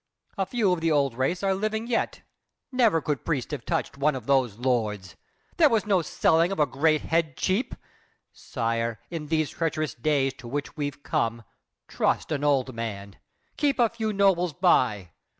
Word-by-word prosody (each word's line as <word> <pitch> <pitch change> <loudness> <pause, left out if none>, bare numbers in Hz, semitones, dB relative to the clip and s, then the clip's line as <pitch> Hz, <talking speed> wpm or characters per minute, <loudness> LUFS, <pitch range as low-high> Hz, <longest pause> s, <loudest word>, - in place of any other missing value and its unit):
A 195 -1 -1
few 210 -4 +1
of 170 - -3
the 165 0 +1
old 140 -4 +2
race 135 +10 -1
are 195 -1 +2
living 215 +3 -2
yet. 235 -1 -2 0.5
Never 230 -10 +3
could 145 -5 -2
priest 150 -6 -2
have 145 -6 -4
touched - - -2
one 150 0 +2
of 125 -4 -6
those 130 -6 +2
lords. 105 -8 -1 0.4
There 315 -3 +6
was 225 -4 +1
no 195 -4 +3
selling 165 +2 +2
of 195 - -3
a 150 - +5
great 155 +2 +1
head 160 -4 0
cheap! 195 +8 0 0.6
Sire, 115 -2 -2
in 160 -3 -5
these 155 -2 0
treacherous 155 -4 -2
days 135 +1 +1
to 120 - -10
which 145 +4 -4
we've 145 -1 -4
come, 115 0 -1 0.4
Trust - - 0
an 145 -2 -1
old 135 -3 +2
man, 100 -4 -6 0.4
keep 285 -2 +1
a 235 -3 +4
few 220 -1 -3
nobles 190 -4 +2
by. 120 - +2
150 Hz, 175 wpm, -26 LUFS, 125-185 Hz, 0.6 s, There